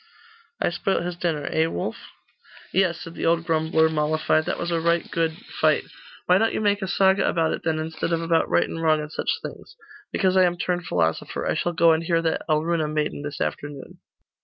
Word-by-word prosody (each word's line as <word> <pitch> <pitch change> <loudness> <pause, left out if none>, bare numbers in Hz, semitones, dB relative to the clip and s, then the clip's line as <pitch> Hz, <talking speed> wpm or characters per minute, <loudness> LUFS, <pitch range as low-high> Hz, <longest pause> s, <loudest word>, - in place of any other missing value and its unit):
I - - +1
spoilt 185 +1 -1
his 175 0 -4
dinner, 165 -4 -2
eh, 160 +1 +2
Wulf?' 90 - -5 0.6
'Yes,' 185 -2 +2
said 165 - -8
the - - -2
old 165 0 +2
grumbler, 160 0 +2
mollified, 155 0 +1
'that - - -2
was 170 0 -3
a 165 - +1
right 170 0 +2
good 165 -1 0 0.2
fight.' - - +3 0.4
'Why 180 +1 +4
don't 225 +1 +1
you - - 0
make 205 -1 +1
a 190 - -2
saga 190 +1 +3
about 165 -1 +1
it, - - -4
then, 160 -1 0
instead 160 +1 -3
of 165 - +1
about 165 0 +1
right 85 0 +3
and 165 - -5
wrong, 155 -1 +3
and 150 0 -6
such - - -3
things?' - - -9 0.4
'Because 185 -2 +1
I 185 -1 +6
am 175 0 0
turned 175 -1 -2
philosopher. 80 -2 -1
I - - +1
shall 175 - -1
go 165 0 +5
and 160 - 0
hear 165 0 +1
that 165 - 0
Alruna 155 +1 +1
maiden 150 -1 -2
this 145 0 -6
afternoon. 145 -2 -5
165 Hz, 210 wpm, -24 LUFS, 155-175 Hz, 0.6 s, I